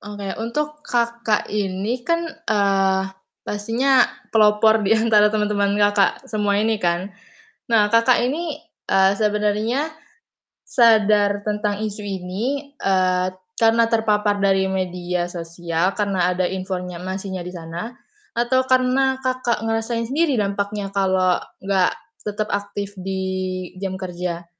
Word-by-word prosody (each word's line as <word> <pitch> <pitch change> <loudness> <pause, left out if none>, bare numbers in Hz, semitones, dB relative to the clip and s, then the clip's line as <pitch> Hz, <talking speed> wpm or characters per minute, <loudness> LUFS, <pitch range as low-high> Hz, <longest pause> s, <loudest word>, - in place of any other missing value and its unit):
Oke. 205 -1 -7
Untuk 300 +6 -3
Kakak 235 -3 0
ini 205 +4 -1
kan, 335 +3 +1 0.3
eee, 195 -2 +2 0.4
pastinya 235 +6 +2 0.3
pelopor 220 0 +5
di 215 - +4
antara 215 -2 +4
teman-teman 205 -1 +1
Kakak 205 -1 +2
semua 205 -2 0
ini 220 0 +1
kan. 175 +3 0 0.6
Nah, 210 -2 +4
Kakak 230 +3 +4
ini, 295 +5 -2 0.3
eee, 190 0 +5
sebenarnya 210 +7 0 0.8
sadar 210 -3 +4
tentang 210 0 -1
isu 210 0 -5
ini, 210 +10 -4
eee, 185 -1 +2 0.3
karena 230 0 +4
terpapar 210 -2 +2
dari 195 -1 +3
media 180 -1 -2
sosial, 170 +1 -2
karena 190 -4 +1
ada 180 0 0
informasinya 185 0 -4
di 180 - -6
sana, 170 +5 -6 0.4
atau 240 +2 +2
karena 260 +1 +2
Kakak 255 -4 -1
ngerasain 225 +1 -1
sendiri 300 +1 +2
dampaknya 200 0 -2
kalau 185 -2 +2 0.2
enggak 190 -2 +2 0.3
tetap 210 0 -2
aktif 200 0 -4
di 190 0 -3 0.6
jam 190 -1 -2
kerja. 175 -2 -4
205 Hz, 115 wpm, -21 LUFS, 190-230 Hz, 0.8 s, pelopor